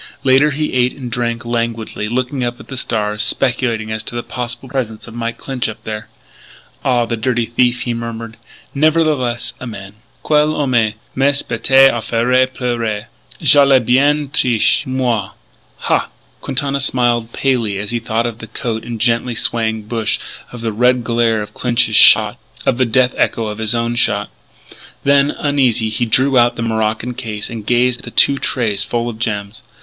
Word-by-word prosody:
Later 135 Hz, +3 st, +4 dB
he 150 Hz, +1 st, -2 dB
ate 125 Hz, 0 st, +2 dB
and 125 Hz, -3 st, -7 dB
drank 120 Hz, -1 st, -2 dB
languidly, 115 Hz, -2 st, -3 dB
looking 130 Hz, +2 st, -2 dB
up 120 Hz, 0 st, -3 dB
at -, -, -14 dB
the 135 Hz, -, -5 dB
stars, 105 Hz, -4 st, -2 dB
speculating 115 Hz, -4 st, 0 dB
as 110 Hz, 0 st, -2 dB
to -, -, -8 dB
the 120 Hz, -, -3 dB
possible 125 Hz, +1 st, -5 dB
presence 125 Hz, -5 st, -4 dB
of 115 Hz, -, -11 dB
Mike 115 Hz, 0 st, -4 dB
Clinch 130 Hz, -4 st, -3 dB
up 110 Hz, 0 st, -9 dB
there. 110 Hz, -1 st, -5 dB, 0.8 s
"Ah, 125 Hz, -2 st, +2 dB
the 115 Hz, -, -2 dB
dirty 120 Hz, +1 st, 0 dB
thief," 120 Hz, +2 st, +1 dB
he 120 Hz, -, -2 dB
murmured; 115 Hz, -1 st, -6 dB, 0.2 s
" -, -, -29 dB
nevertheless 150 Hz, -7 st, +1 dB
a 130 Hz, -, -7 dB
man. 100 Hz, -3 st, -8 dB, 0.3 s
Quel 150 Hz, 0 st, +2 dB
homme! 145 Hz, -3 st, -1 dB, 0.4 s
Mais 140 Hz, +2 st, +1 dB
bête 135 Hz, +3 st, +4 dB
à 120 Hz, -, -2 dB
faire 125 Hz, +3 st, +2 dB
pleurer! 120 Hz, -4 st, -3 dB, 0.3 s
Je 145 Hz, -1 st, +6 dB
l'ai 135 Hz, -1 st, +5 dB
bien 140 Hz, +5 st, +2 dB
triché, 125 Hz, -5 st, +2 dB
moi! 125 Hz, -6 st, -1 dB, 0.5 s
Ha!" -, -, 0 dB, 0.3 s
Quintana 140 Hz, +1 st, -2 dB
smiled 120 Hz, -3 st, +1 dB
palely 120 Hz, -8 st, 0 dB
as 100 Hz, +2 st, -4 dB
he 120 Hz, -, -1 dB
thought 115 Hz, 0 st, -1 dB
of 115 Hz, -1 st, -4 dB
the 115 Hz, -, -9 dB
coat 110 Hz, -1 st, -4 dB
and 120 Hz, 0 st, -5 dB
the -, -, +1 dB
gently 120 Hz, 0 st, +1 dB
swaying 110 Hz, -1 st, -1 dB
bush 110 Hz, 0 st, -1 dB, 0.3 s
of 120 Hz, -, -9 dB
the 115 Hz, -1 st, -2 dB
red 125 Hz, +2 st, +2 dB
glare 115 Hz, -2 st, +1 dB
of 105 Hz, -, -12 dB
Clinch's 125 Hz, -3 st, +1 dB
shot, -, -, +6 dB, 0.3 s
of 120 Hz, -, +1 dB
the 130 Hz, -, +4 dB
death 125 Hz, +2 st, +3 dB
echo 115 Hz, -, +1 dB
of 105 Hz, 0 st, -5 dB
his 110 Hz, +1 st, 0 dB
own 115 Hz, 0 st, -1 dB
shot. -, -, +1 dB, 0.7 s
Then, 140 Hz, 0 st, +4 dB
uneasy, 130 Hz, -7 st, +1 dB
he 115 Hz, +2 st, -1 dB
drew 130 Hz, +3 st, +3 dB
out 120 Hz, 0 st, +3 dB
the 115 Hz, -, -3 dB
morocco 110 Hz, +1 st, -1 dB
case 110 Hz, -3 st, -5 dB
and 115 Hz, -2 st, -6 dB
gazed 125 Hz, 0 st, +2 dB
at -, -, -12 dB
the -, -, -6 dB
two 140 Hz, -1 st, +3 dB
trays 105 Hz, -6 st, 0 dB
full 120 Hz, +3 st, -2 dB
of 115 Hz, -2 st, -6 dB
gems. 105 Hz, -2 st, -3 dB
120 Hz, 185 wpm, -17 LUFS, 115-130 Hz, 0.8 s, Je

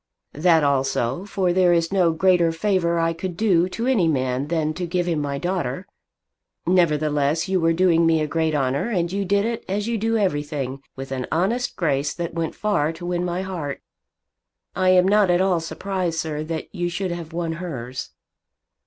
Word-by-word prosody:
"That 160 Hz, +1 st, +3 dB
also; 135 Hz, +2 st, 0 dB
for 190 Hz, -3 st, 0 dB
there 180 Hz, -1 st, +4 dB
is 170 Hz, +2 st, +1 dB
no 180 Hz, -4 st, +3 dB
greater 175 Hz, 0 st, +3 dB
favour 170 Hz, -1 st, +1 dB
I 165 Hz, 0 st, +1 dB
could 175 Hz, +1 st, -5 dB
do 185 Hz, -5 st, +3 dB
to 230 Hz, +5 st, -4 dB
any 235 Hz, -10 st, +3 dB
man 130 Hz, -2 st, 0 dB
than 155 Hz, -1 st, 0 dB
to 175 Hz, +2 st, -4 dB
give 175 Hz, 0 st, 0 dB
him 165 Hz, -4 st, 0 dB
my 140 Hz, -1 st, -2 dB
daughter. 175 Hz, -6 st, -2 dB, 0.8 s
Nevertheless, 155 Hz, -3 st, +2 dB
you 190 Hz, -1 st, +1 dB
were 165 Hz, 0 st, +3 dB
doing 170 Hz, -1 st, +3 dB
me 165 Hz, -1 st, +3 dB
a 155 Hz, -, 0 dB
great 160 Hz, 0 st, 0 dB
honour, 135 Hz, -, 0 dB
and 175 Hz, -6 st, 0 dB
you 200 Hz, +1 st, -1 dB
did 200 Hz, +2 st, +2 dB
it, 230 Hz, 0 st, -3 dB
as 205 Hz, +3 st, -1 dB
you 230 Hz, -1 st, -1 dB
do 225 Hz, +2 st, +1 dB
everything, 145 Hz, -, -2 dB
with 135 Hz, 0 st, -7 dB
an 130 Hz, -1 st, -3 dB
honest 210 Hz, +10 st, 0 dB
grace 145 Hz, -4 st, 0 dB
that 170 Hz, -1 st, -4 dB
went 165 Hz, -1 st, -3 dB
far 200 Hz, -8 st, 0 dB
to 170 Hz, +2 st, -9 dB
win 175 Hz, 0 st, -1 dB
my 180 Hz, +1 st, -2 dB
heart. 165 Hz, -7 st, -5 dB, 0.9 s
I 185 Hz, 0 st, +2 dB
am 185 Hz, 0 st, +5 dB
not 205 Hz, -1 st, +4 dB
at 175 Hz, 0 st, +3 dB
all 185 Hz, -2 st, +2 dB
surprised, 180 Hz, 0 st, -3 dB
sir, 155 Hz, -2 st, -2 dB
that 160 Hz, 0 st, -5 dB
you 175 Hz, -2 st, -2 dB
should 185 Hz, +1 st, -3 dB
have 170 Hz, -2 st, -6 dB
won 165 Hz, 0 st, -2 dB
hers." 130 Hz, -7 st, -5 dB
170 Hz, 190 wpm, -23 LUFS, 155-185 Hz, 0.9 s, am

